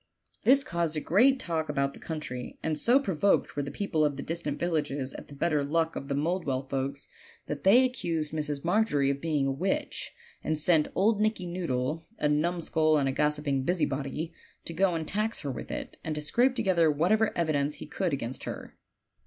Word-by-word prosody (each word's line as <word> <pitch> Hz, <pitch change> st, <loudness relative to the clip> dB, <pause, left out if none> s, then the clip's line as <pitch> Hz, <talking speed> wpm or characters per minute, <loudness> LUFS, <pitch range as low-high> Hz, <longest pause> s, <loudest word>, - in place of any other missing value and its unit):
This 275 Hz, +2 st, +6 dB
caused 170 Hz, -, -1 dB
a -, -, +2 dB
great 240 Hz, -, +4 dB
talk 160 Hz, -6 st, -2 dB
about 140 Hz, -1 st, 0 dB
the -, -, -13 dB
country; 150 Hz, -6 st, -5 dB
and 160 Hz, -1 st, 0 dB
so 240 Hz, -, +4 dB
provoked 200 Hz, -, +1 dB
were 145 Hz, -, 0 dB
the' 140 Hz, -, -4 dB
people 160 Hz, -3 st, 0 dB
of 145 Hz, -2 st, +1 dB
the 140 Hz, -, -4 dB
distant 160 Hz, -3 st, -3 dB
villages 145 Hz, -6 st, -1 dB
at -, -, -9 dB
the 145 Hz, -, -11 dB
better 150 Hz, 0 st, +1 dB
luck 160 Hz, +3 st, 0 dB
of 140 Hz, -, -5 dB
the 140 Hz, -, -1 dB
Mouldwell 145 Hz, -3 st, -1 dB
folks 135 Hz, +1 st, -3 dB, 0.4 s
that 150 Hz, -, -5 dB
they 225 Hz, +7 st, +7 dB
accused 165 Hz, -12 st, -1 dB
Mrs. 150 Hz, -2 st, -2 dB
Margery 170 Hz, -8 st, +2 dB
of 140 Hz, 0 st, -4 dB
be 160 Hz, -2 st, 0 dB
ing 135 Hz, -, +2 dB
a 135 Hz, -, +1 dB
witch, 195 Hz, -, -2 dB, 0.3 s
and 155 Hz, -, 0 dB
sent 155 Hz, 0 st, +3 dB
old 210 Hz, +2 st, +3 dB
Nicky 215 Hz, -4 st, +1 dB
Noodle, 165 Hz, -3 st, -2 dB
a 150 Hz, -, +1 dB
numskull 155 Hz, 0 st, +2 dB
and 140 Hz, -2 st, +1 dB
a -, -, +1 dB
gossiping 150 Hz, -1 st, 0 dB
busybody, 150 Hz, 0 st, -1 dB, 0.3 s
to 165 Hz, -, -5 dB
go 180 Hz, +1 st, +2 dB
and 160 Hz, -1 st, -3 dB
tax 215 Hz, +2 st, -1 dB
her 140 Hz, -, -3 dB
with 125 Hz, -, -7 dB
it, -, -, -6 dB
and 155 Hz, -, -3 dB
to 150 Hz, -, -3 dB
scrape 245 Hz, -, +2 dB
together 185 Hz, -8 st, +3 dB
whatever 185 Hz, +9 st, +2 dB
evidence 150 Hz, -3 st, +1 dB
he -, -, -8 dB
could 185 Hz, -3 st, -2 dB
against 130 Hz, -2 st, -4 dB
her. -, -, -7 dB
155 Hz, 200 wpm, -29 LUFS, 145-180 Hz, 0.4 s, they